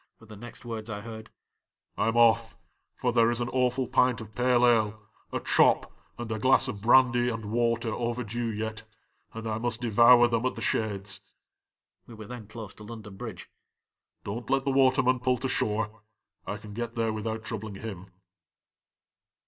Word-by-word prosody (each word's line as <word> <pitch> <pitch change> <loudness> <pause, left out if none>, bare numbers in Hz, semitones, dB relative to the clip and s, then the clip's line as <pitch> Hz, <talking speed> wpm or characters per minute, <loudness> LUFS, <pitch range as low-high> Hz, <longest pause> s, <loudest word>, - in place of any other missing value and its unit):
were 115 - -16
the 110 -1 -12
next 120 +2 -11
words 115 -1 -6
I 105 -1 -5
heard; 110 0 -9 0.3
" - - -57
I - - 0
!m 115 +1 0
off, 115 -1 +4 0.4
for - - -1
there 115 0 +4
is 120 0 0
an 120 0 -2
awful 130 0 0
pint 125 -2 +2
of 110 -1 -10
pale 125 +1 +3
ale, 110 -3 +2 0.3
a - - -2
chop, - - +3 0.2
and 120 -1 -6
a 110 - -2
glass 130 +3 +4
of 105 -5 -5
brandy 120 +1 +4
and 115 -3 -5
water 115 -1 0
overdue 120 -1 -2
yet, 110 0 -4 0.5
and 115 0 -8
I 110 0 -2
must 120 -1 -2
devour 120 +1 +6
them 115 -1 0
at - - -3
the - - -7
Shades." 100 -2 -2 0.9
(We 115 - -11
were 110 0 -9
then 120 -2 -9
close 110 -2 -8
to 105 - -13
London 105 -2 -9
Bridge.) - - -8 0.7
"Don't 110 +3 -6
let 135 0 +1
the 140 - +1
waterman 130 -1 +3
pull 125 0 +1
to 130 - -2
shore; 110 -2 -1 0.5
I 105 - -3
can 105 0 -11
get 115 +1 -4
there 115 -2 0
without 110 +1 -4
troubling 110 -1 -5
him." 95 -3 -7
115 Hz, 180 wpm, -28 LUFS, 110-120 Hz, 0.9 s, devour